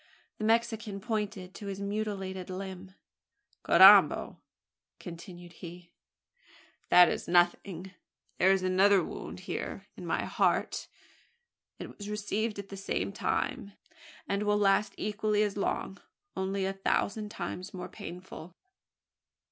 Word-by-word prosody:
The 215 - -2
Mexican 225 -2 0
pointed 205 -4 -3
to 205 - -8
his 195 -1 -5
mutilated 200 -3 -4
limb. 190 0 -7 0.7
"Carrambo!" - - +7 0.6
continued 175 0 -10
he, 175 0 -11 1.0
"that 180 0 +8
is - - -3
nothing. 175 +1 +1 0.5
There 190 +2 +5
is 190 -1 +2
another 190 +1 +4
wound - - -7
here - - -4
here - - -8
in - - -8
my - - 0
heart. - - 0 0.9
It - - -9
was 205 -1 -8
received 210 +1 -2
at 200 -1 -7
the 195 - -8
same 195 0 -2
time; 200 0 -2 0.5
and 200 +1 -1
will 210 0 +2
last 200 0 +2
equally 210 0 0
as 205 -2 -2
long 200 -1 -2 0.3
only 190 0 -1
a 195 - -1
thousand 200 +2 -1
times 185 -3 -6
more 180 -1 -6
painful." 180 -3 -10
195 Hz, 125 wpm, -30 LUFS, 185-210 Hz, 1.0 s, that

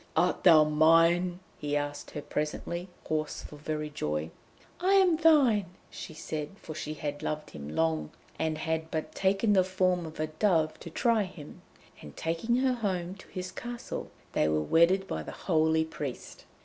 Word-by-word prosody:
'Art - - +2
thou 165 -5 +8
mine?' 165 +4 +4 0.2
he 145 0 -1
asked 145 0 -4
her 150 - -6
presently, 170 +4 -3 0.2
hoarse 155 -1 -2
for 150 - -10
very 150 0 -4
joy. 75 - -2 0.5
'I 370 +3 +3
am 370 -4 +5
thine!' 255 - +4 0.2
she 160 - -8
said, 150 -1 -4
for 155 - -8
she 155 0 -5
had 145 -1 -4
loved 155 0 -3
him 70 -1 -8
long, 80 -2 +1 0.3
and 160 -1 0
had 160 0 -2
but 155 -1 -3
taken 195 +3 +2
the 190 -2 +5
form 185 -2 +1
of 155 - -10
a 155 - +1
dove 155 0 +1
to - - -8
try 230 +6 +2
him. 180 -7 -8 0.4
And 75 - -12
taking 165 +9 0
her 260 0 +2
home 185 -6 -2
to 195 - -14
his 180 0 -6
castle, 240 +2 -6 0.2
they 75 - +2
were 75 0 +1
wedded 180 - +4
by - - -3
the - - -8
holy 160 -2 +3
priest. 145 -5 -7
160 Hz, 175 wpm, -29 LUFS, 150-190 Hz, 0.5 s, thou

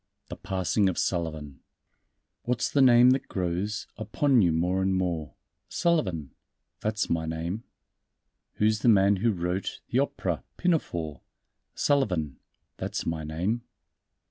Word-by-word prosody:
_ - - -36
The - - -5
Passing 95 +1 0
of 90 - -4
Sullivan 80 -5 -2 0.8
"What's 120 -1 -1
the 140 - +3
name 125 -1 +7
that 135 +1 0
grows 95 +2 -2
Upon 120 +4 +2
you 85 -4 +4
more 90 +4 +1
and 95 0 +1
more?" 85 -5 -2 0.3
"Sullivan!" 95 - 0 0.5
"That's 110 +1 -1
my 80 -1 -1
name." 85 +7 -4 0.9
"Who's 110 0 +2
the 120 - +3
man 100 -2 +5
who 115 +4 +2
wrote 90 0 -3
The - - +2
opera, - - -1
Pinafore?" 85 - -1 0.5
"Sullivan!" 90 - 0 0.4
"That's - - -4
my 80 -1 -2
name." 90 +10 -2
95 Hz, 130 wpm, -27 LUFS, 85-115 Hz, 0.9 s, name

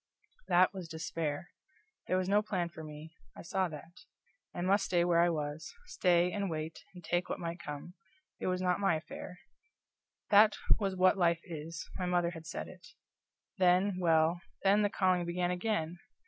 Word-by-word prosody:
That 180 +1 +4
was 185 -3 -6
despair. 160 0 -4 0.6
There 185 - +2
was 185 0 0
no 205 +2 +4
plan 185 -5 -2
for 160 -2 -10
me; 155 +1 -10 0.2
I - - -8
saw 190 +1 0
that; 160 +2 -11 0.5
I 175 - -5
must 195 +3 +2
stay 175 -2 +2
where 170 -1 +3
I 175 - +4
was; 150 - -4
stay, 180 - +2
and 200 -1 -2
wait, 155 0 -4 0.2
and 180 - -11
take 175 +2 -1
what - - -3
might 170 0 -4
come 150 +2 -7 0.5
it - - -3
was 185 0 0
not 180 0 +2
my 195 -5 +3
affair; 155 +3 -7 0.9
that 210 +1 +7 0.2
was 195 -3 -1
what 185 +1 +4
life 170 -1 +3
is 165 -1 -7
my 180 - -1
mother 175 -1 +1
had 165 -2 -10
said - - -5
it. 180 -3 -13 0.7
Then 185 +1 +3
well, 165 0 +3 0.2
then 200 +2 +5
the 205 - +2
calling 185 -2 +2
began 175 +1 -1
again! 180 -3 -2
175 Hz, 175 wpm, -32 LUFS, 165-185 Hz, 0.9 s, that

